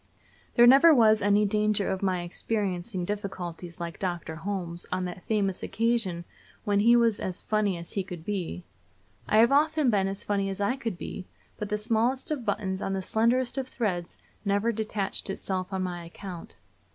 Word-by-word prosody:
There 240 - +8
never 280 +6 +8
was 220 -3 +5
any 205 +1 +4
danger 210 0 +1
of 190 - -2
my 185 -3 0
experiencing 185 0 -2
difficulties 180 -4 -5
like 170 -1 -5
Dr. 175 -4 -3
Holmes 175 -2 -4
on 185 0 -1
that 180 0 -7
famous 200 -4 0
occasion 225 -7 -1 0.4
when 205 -1 +2
he 235 +3 +6
was 230 -3 +3
as 185 -1 -4
funny 210 -4 +1
as 170 0 -8
he 195 - -1
could 175 -3 -9
be. 175 - -3 0.7
I 215 - +4
have 230 +3 +6
often 300 -2 +3
been 195 -2 +2
as 195 +1 -4
funny 200 -1 0
as 195 +1 -4
I 205 +5 +1
could 230 -9 -4
be, 185 +1 -7 0.3
but 210 - -4
the 210 - 0
smallest 235 +6 0
of 270 -6 -2
buttons 195 -2 -1
on 195 - -2
the 190 -1 -2
slenderest 240 +6 +1
of 260 - -3
threads 185 -9 -3 0.3
never 205 +3 +1
detached 210 -3 -3
itself 190 -1 -3
on 190 -1 -1
my 175 -2 -4
account. 175 +1 -9
200 Hz, 180 wpm, -27 LUFS, 185-225 Hz, 0.7 s, There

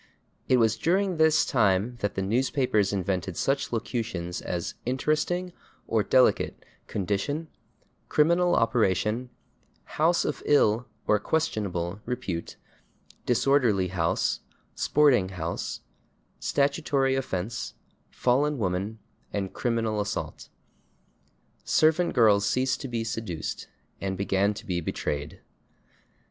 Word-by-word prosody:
It 130 - +5
was 110 -2 +3
during 190 +4 +2
[Pg127] - - -6
this 160 -1 +5
time 110 0 +2
that 105 -2 -2
the 95 - -1
newspapers 115 -1 +1
invented 95 -2 -2
such 135 +1 0
locutions 110 -7 -3
as 85 -1 -3
/interesting/ 155 +7 0 0.3
(or 110 -2 +1
/delicate/) 130 +3 +3 0.3
/condition/, 100 - -2 0.6
/criminal 170 +3 +3
operation/, 115 +1 +1 0.7
/house 165 +3 +3
of 150 - -2
ill/ 120 -4 +3 0.2
(or 105 - +3
/questionable/) 100 - -2
/repute/, 120 -9 -4 0.7
/disorderly 120 -7 +2
house/, 85 -2 0 0.4
/sporting 135 -10 +3
house/, 85 -3 -4 0.6
/statutory 140 -1 +1
offense/, 115 -3 -3 0.4
/fallen 140 +4 +1
woman/ 100 +1 -2 0.3
and 100 -2 -3
/criminal 115 -3 0
assault/. 105 +1 -5 1.1
Servant 160 +3 +3
girls 105 -3 +5
ceased 130 +1 0
to 135 - -4
be 115 -2 -2
seduced, 110 -7 -4 0.3
and 95 -1 -2
began 100 +1 +1
to - - -9
be 90 -2 -1
/betrayed 75 -2 -4
115 Hz, 105 wpm, -27 LUFS, 95-135 Hz, 1.1 s, It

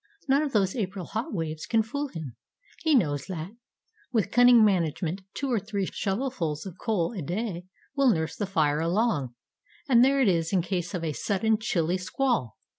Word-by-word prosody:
None 275 +2 +4
of 300 -2 -2
those 195 -5 +1
April 195 -5 -3
hot 220 +8 -4
waves 160 -4 -4
can 225 -1 +3
fool 285 +6 -3
him; 160 - -8 0.4
he 320 -5 +2
knows 145 - +1
that, 175 -1 -5 0.6
with 215 -4 0
cunning 245 -2 +7
management, 175 -1 0
two 275 -2 -2
or 235 - +2
three 200 0 -3
shovelfuls 195 - -2
of 185 -2 -9
coal 210 -5 0
a 190 - -4
day 180 +2 -4 0.3
will 275 -2 +4
nurse 160 -7 0
the 205 - -3
fire 155 -6 +1
along, 165 - 0 0.5
and 245 -3 +6
there 275 +1 +4
it 260 - +4
is 165 -3 +1
in 185 -3 +2
case 180 -1 -3
of 170 - -3
a 155 -2 -1
sudden 210 +6 0
chilly 180 -5 0
squall. 185 - -1
195 Hz, 185 wpm, -27 LUFS, 165-235 Hz, 0.6 s, cunning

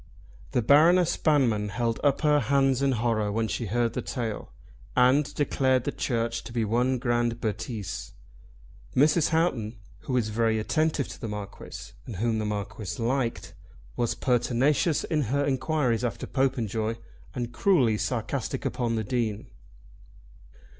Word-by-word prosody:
The 125 - +2
Baroness 165 +7 +5
Banmann 120 -9 +2
held 115 +2 -1
up 140 -2 +2
her 150 -1 +4
hands 135 +1 +2
in 135 -1 +2
horror 110 -3 0
when 110 +1 0
she 115 +1 -3
heard 115 +2 0
the - - -2
tale, 115 -4 -4 0.4
and 130 +3 +4
declared 130 -3 +1
the - - -2
Church 115 -2 -2
to - - -8
be 115 -2 0
one 125 +4 +1
grand 120 -1 0
bêtise. 110 -2 -4 0.8
Mrs. 150 +3 +4
Houghton, 130 -10 0 0.2
who 130 - -5
was 120 -4 +1
very 110 0 +1
attentive 155 +5 0
to - - -10
the 115 - -3
Marquis 105 -2 -7 0.2
and 115 - -6
whom 110 +3 0
the 110 - -2
Marquis 105 0 -4
liked, 115 -7 -1 0.4
was 120 -2 0
pertinacious 130 +5 +1
in 155 -3 0
her 140 +5 0
enquiries 130 -3 0
after 120 - -2
Popenjoy, 115 -5 -1 0.4
and 120 -1 -4
cruelly 120 - +3
sarcastic - - -2
upon 120 -2 -1
the 110 - -1
Dean. 110 -2 -2
120 Hz, 145 wpm, -27 LUFS, 110-135 Hz, 0.8 s, Baroness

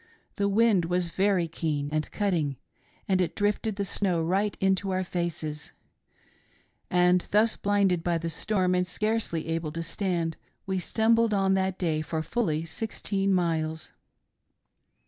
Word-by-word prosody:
The 200 0 +1
wind 205 -4 +3
was 175 0 0
very 190 -3 +2
keen 150 -3 -2
and 155 0 -1
cutting, 165 -10 -1 0.5
and 185 -1 +2
it 180 - -1
drifted 205 +1 0
the 200 0 -2
snow 185 -2 0
right 195 +5 0
into 195 0 +1
our 185 0 0
faces; 165 -4 -4 1.2
and 180 0 +3
thus 215 +2 +3
blinded 195 -4 +1
by 170 -1 +1
the 165 0 -3
storm, 185 +1 0
and 180 0 +1
scarcely 215 -5 -1
able 165 -1 -2
to 165 0 -3
stand, 170 -2 -2 0.3
we 190 -1 -1
stumbled 225 +2 +2
on 195 -1 +2
that 190 -1 0
day 160 -4 0
for 155 0 -3
fully 165 -5 -1
sixteen 200 +1 -2
miles. 160 -3 0
180 Hz, 145 wpm, -27 LUFS, 165-200 Hz, 1.2 s, wind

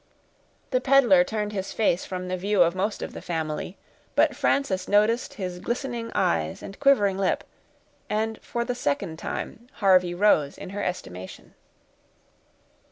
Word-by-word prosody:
The 255 -1 +2
peddler 255 -9 +6
turned 210 +1 -3
his 190 -1 -3
face 195 -5 +1
from 185 -1 -5
the 185 - -1
view 195 0 +3
of 170 0 +1
most 200 +3 -2
of - - -6
the - - -7
family; 160 +1 -4 0.4
but - - +3
Frances 190 -10 0
noticed 215 +4 +2
his 180 -3 -5
glistening 240 +1 -3
eyes 80 -1 0
and 195 - -9
quivering 210 -9 +3
lip, 195 - +1 0.7
and, 220 +1 -1
for 235 0 -3
the 245 - -1
second 160 -5 -2
time, 235 +7 -5
Harvey 185 -4 +3
rose 175 -7 +3
in - - -8
her 205 +1 -4
estimation. 95 - -6
195 Hz, 150 wpm, -25 LUFS, 180-225 Hz, 0.7 s, peddler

